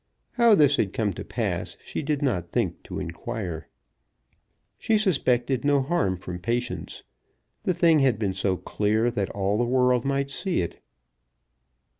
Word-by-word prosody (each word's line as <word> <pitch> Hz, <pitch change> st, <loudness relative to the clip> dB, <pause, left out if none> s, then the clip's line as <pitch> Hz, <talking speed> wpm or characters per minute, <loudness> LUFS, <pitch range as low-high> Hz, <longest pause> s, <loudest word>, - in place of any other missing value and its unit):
How 235 Hz, -3 st, +5 dB
this 145 Hz, -3 st, +4 dB
had 100 Hz, -3 st, 0 dB
come 105 Hz, -3 st, 0 dB
to -, -, -7 dB
pass -, -, -3 dB
she -, -, -4 dB
did 145 Hz, -1 st, -1 dB
not 90 Hz, -, 0 dB
think -, -, -1 dB
to -, -, -6 dB
inquire. 85 Hz, -2 st, -5 dB, 1.1 s
She 220 Hz, -, +2 dB
suspected 135 Hz, -, +1 dB
no 145 Hz, 0 st, +3 dB
harm 100 Hz, -, 0 dB
from 90 Hz, -1 st, -7 dB
Patience. 120 Hz, +5 st, -3 dB, 0.6 s
The 185 Hz, -, 0 dB
thing 165 Hz, -2 st, +4 dB
had 130 Hz, -5 st, +3 dB
been 100 Hz, -3 st, -1 dB
so 95 Hz, 0 st, 0 dB
clear, 110 Hz, +5 st, 0 dB
that 100 Hz, -5 st, -2 dB
all 100 Hz, +2 st, -1 dB
the -, -, +3 dB
world 125 Hz, 0 st, +2 dB
might 140 Hz, 0 st, -1 dB
see 185 Hz, -, -1 dB
it. 85 Hz, -, -5 dB
120 Hz, 155 wpm, -25 LUFS, 100-145 Hz, 1.1 s, How